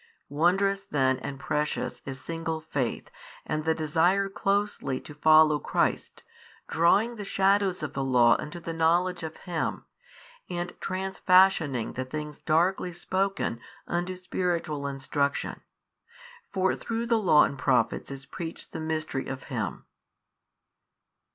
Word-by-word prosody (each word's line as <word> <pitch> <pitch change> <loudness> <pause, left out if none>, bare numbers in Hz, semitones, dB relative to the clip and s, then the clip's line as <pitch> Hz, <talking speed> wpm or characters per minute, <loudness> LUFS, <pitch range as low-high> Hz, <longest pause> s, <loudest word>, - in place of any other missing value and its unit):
Wondrous 195 +6 +2
then 130 -8 +1
and 135 +3 -6
precious 150 +1 -2
is 135 -1 -5
single 165 +2 -3
faith 145 -6 -3 0.3
and 155 0 -2
the 160 0 +2
desire 170 +6 +2
closely 195 -9 -1
to 150 - -11
follow 155 0 +5
Christ, - - -1 0.4
drawing 205 +9 +3
the 210 - -5
shadows 195 -2 +2
of 145 -2 -4
the 135 - -2
law 125 -3 +5
unto 170 +3 -6
the 165 0 -5
knowledge 175 +2 +2
of 160 -1 -6
Him, 175 -3 -3 0.6
and 175 0 -3
transfashioning 185 - +2
the 130 - -3
things 150 +2 -6
darkly 175 +3 +1
spoken 190 -7 -1 0.3
unto 175 +2 -2
spiritual 175 -5 -2
instruction. 140 +1 -2 0.9
For 190 -1 +1
through 230 0 -3
the 230 -1 +2
law 155 -6 +6
and - - -1
the 135 - -11
prophets - - +1
is 135 0 -8
preached 165 -2 -7
the - - -5
Mystery 155 -3 -3
of 135 0 -5
Him. - - -3
160 Hz, 130 wpm, -27 LUFS, 145-185 Hz, 0.9 s, law